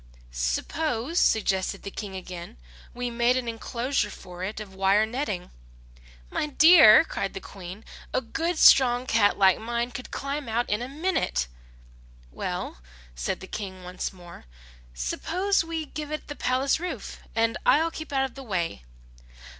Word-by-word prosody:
"Suppose," 235 - -1
suggested 195 -2 +1
the 200 - -6
King 200 -2 -6
again, 180 - -8 0.3
"we 245 0 -4
made 240 +2 +2
an 250 -2 -3
enclosure 235 +1 -1
for 180 -2 -9
it 205 +3 -4
of 205 -3 -9
wire 195 +3 +3
netting." 220 -6 -4 0.8
"My - - -1
dear," 305 -4 +8
cried 195 -10 -4
the - - -3
Queen, 190 +2 -10 0.3
"a - - +1
good 325 +8 -2
strong 250 -4 +6
cat 215 -4 +3
like 190 -2 +5
mine 235 +2 -2
could 250 - -7
climb 280 -1 -4
out 235 +2 0
in 210 +2 +1
a 250 - -4
minute." 300 - 0 0.9
"Well," - - -4 0.3
said - - -3
the - - -7
King 190 -3 -6
once 180 0 -4
more, 175 - -13 0.5
"suppose 355 - 0
we 325 -1 -4
give 300 0 -6
it 305 - -5
the 290 - -5
palace 265 +3 +1
roof, 360 +1 -5 0.2
and 230 0 +2
I 310 - +5
will 330 - -1
keep 315 -1 -8
out 270 -1 +2
of 260 - -7
the 275 - -9
way." 175 - -2
235 Hz, 160 wpm, -26 LUFS, 190-280 Hz, 0.9 s, dear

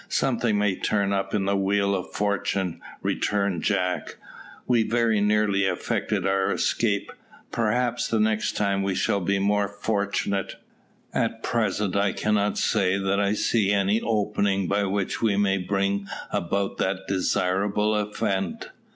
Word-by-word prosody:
"Something 110 -3 +1
may 105 -2 +1
turn 100 -2 0
up 95 0 -1
in 100 -2 0
the 100 0 +1
wheel 100 +1 +1
of 95 -2 -3
Fortune," 100 -3 -1 0.2
returned 100 -4 0
Jack. 90 0 -1 0.5
"We 120 -2 +3
very 115 -2 +1
nearly 105 -1 +2
effected 95 - -1
our 95 0 +1
escape; 105 -4 0 0.4
perhaps 120 +2 0
the 115 - 0
next 110 0 +1
time 100 -1 +1
we 95 -1 -1
shall 100 - +1
be 100 +2 0
more 100 +1 +1
fortunate; 100 -1 -2 0.6
at - - -1
present 105 -4 0
I 100 -1 +2
cannot 105 -1 0
say 95 0 +2
that 100 0 0
I 100 0 +2
see 105 -1 +1
any 100 +2 +2
opening 100 -3 0
by 100 +2 +1
which 100 0 -2
we 105 -4 +2
may 100 -1 +2
bring 100 +1 -1 0.2
about 95 +3 -1
that 95 0 -1
desirable 100 +3 +1
event." 100 -3 -2
100 Hz, 140 wpm, -25 LUFS, 95-105 Hz, 0.6 s, We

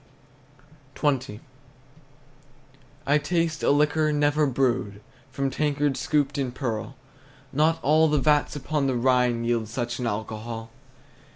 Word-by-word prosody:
XX. 135 -7 -1 1.7
I 145 +2 +3
taste 165 0 -1
a - - +2
liquor 150 +2 +2
never 145 0 +2
brewed, 125 -6 0 0.3
From 135 +1 -2
tankards 145 -1 0
scooped 145 -2 0
in 130 -3 -1
pearl; 125 -1 -4 0.6
Not 155 +3 +3
all 155 +3 +4
the 150 -1 +1
vats 150 +1 +2
upon 145 0 -1
the 130 - 0
Rhine 125 -1 +2
Yield 115 -2 0
such 120 +2 -4
an 125 - -2
alcohol! 110 +1 -5
135 Hz, 120 wpm, -25 LUFS, 120-150 Hz, 1.7 s, all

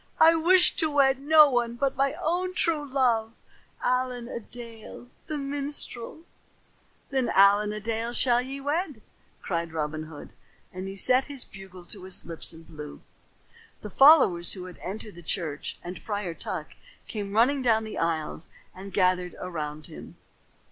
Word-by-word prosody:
"I 325 +1 +8
wish 350 +3 +5
to 315 - +1
wed 270 -2 +3
no 305 +1 +7
one 240 -3 0
but 275 +2 0
my 275 +1 +1
own 365 +2 -1
true 305 -5 0
love, 235 -4 +1 0.5
Allen 250 -1 0
a 240 - -5
Dale 235 +1 -11 0.2
the 305 - -3
minstrel." 280 -1 -5 0.9
"Then 265 -3 +1
Allen 205 +2 +5
a 210 - -4
Dale 225 +2 -2
ye - - -5
shall 260 +2 +2
wed," 295 - -2 0.4
cried 170 -2 -2
Robin 155 0 -3
Hood, 155 -2 -10 0.4
and 190 +1 -5
set 255 +4 +4
his 280 -3 -7
bugle 190 -2 -12
to 190 +1 -7
his 190 - -1
lips 165 -1 -4
and 165 0 -13
blew. 150 -2 -9 0.8
The 210 - -7
followers 265 - +6
who 185 -2 -7
had 180 -2 -11
entered 210 +2 -7
the 175 - -12
church 155 -3 -3
and 180 +1 -7
Friar 205 -5 -3
Tuck 165 0 -5 0.4
came 200 -2 -5
running 260 +5 +4
down 225 -3 +3
the 220 - -6
aisles 165 -1 -2 0.2
and 195 +1 -10
gathered 180 -2 +1
around 155 -4 -5
him. - - -11
225 Hz, 155 wpm, -27 LUFS, 180-275 Hz, 0.9 s, I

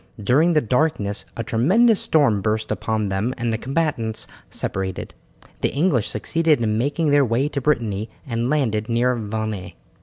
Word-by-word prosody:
During 145 - +3
the 150 - +4
darkness 120 -5 0
a 115 - -2
tremendous 190 - +3
storm 135 -10 +2
burst 110 +1 -1
upon 110 -2 -1
them 105 +7 -1
and 120 -1 -1
the - - 0
combatants 130 -6 -1 0.2
separated. 95 -1 -4 0.5
The - - +1
English 140 - +1
succeeded 160 +7 +1
in 110 -2 0
making 145 +6 0
their 145 0 +5
way 125 +3 +1
to 140 - -3
Brittany 115 -7 0 0.2
and 120 -2 -2
landed 115 -8 0
near 120 +2 +2
Vannes. 110 -3 -4
120 Hz, 155 wpm, -22 LUFS, 110-145 Hz, 0.5 s, their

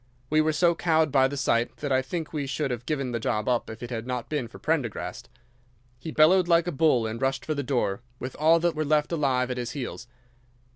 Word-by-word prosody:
We 155 0 +4
were 155 0 +2
so 170 +3 +3
cowed 160 -2 +2
by 130 -1 +4
the 140 +1 -5
sight 115 -2 0
that 145 -2 -4
I 130 0 +3
think 160 +5 -5
we 145 -3 -2
should 135 +1 -2
have 120 0 -5
given 135 -5 -1
the 115 - -2
job 105 -1 -1
up 125 -2 0
if 110 +2 -8
it 120 - -7
had 115 0 -4
not 125 -2 -4
been 145 -6 -2
for - - -13
Prendergast. 145 -9 -3 0.7
He 160 - -7
bellowed 170 +4 +4
like 170 -1 +4
a 175 - -2
bull 140 -6 +2
and 110 +1 -4
rushed 135 -1 -1
for 155 - -1
the 145 - -2
door 120 -6 -1 0.2
with 125 +1 -6
all 160 +2 +5
that 175 -1 +2
were 155 - -1
left 150 +1 +1
alive 130 -6 +1
at 125 - -3
his 120 -1 -4
heels. 125 -2 -6
140 Hz, 240 wpm, -26 LUFS, 125-155 Hz, 0.7 s, all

